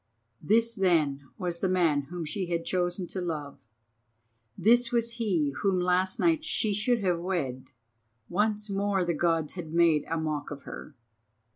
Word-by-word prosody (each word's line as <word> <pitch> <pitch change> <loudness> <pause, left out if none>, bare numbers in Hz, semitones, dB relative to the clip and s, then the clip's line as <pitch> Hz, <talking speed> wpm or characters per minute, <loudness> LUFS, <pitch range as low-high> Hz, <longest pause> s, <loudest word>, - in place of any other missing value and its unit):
This 230 +7 +3
then 155 - +1
was 175 -2 -3
the 190 - +1
man 170 -6 +2
whom 175 -2 -5
she 180 +5 -3
had 170 -1 -2
chosen 175 +1 -1
to 185 - -4
love, 150 -5 -4 1.0
this 235 +5 +4
was 235 -1 0
he 170 -10 +1
whom 195 -2 +1
last 180 +1 +1
night 325 -2 +2
she 220 -9 0
should 230 +3 +1
have 180 -3 +1
wed. 155 -8 -3 0.6
Once 210 +3 0
more 200 -1 0
the 170 - 0
Gods 165 -1 0
had 165 -4 -7
made 165 -3 +4
a 165 - 0
mock 155 -2 -3
of 140 -1 -8
her. 150 - -9
180 Hz, 160 wpm, -28 LUFS, 160-205 Hz, 1.0 s, this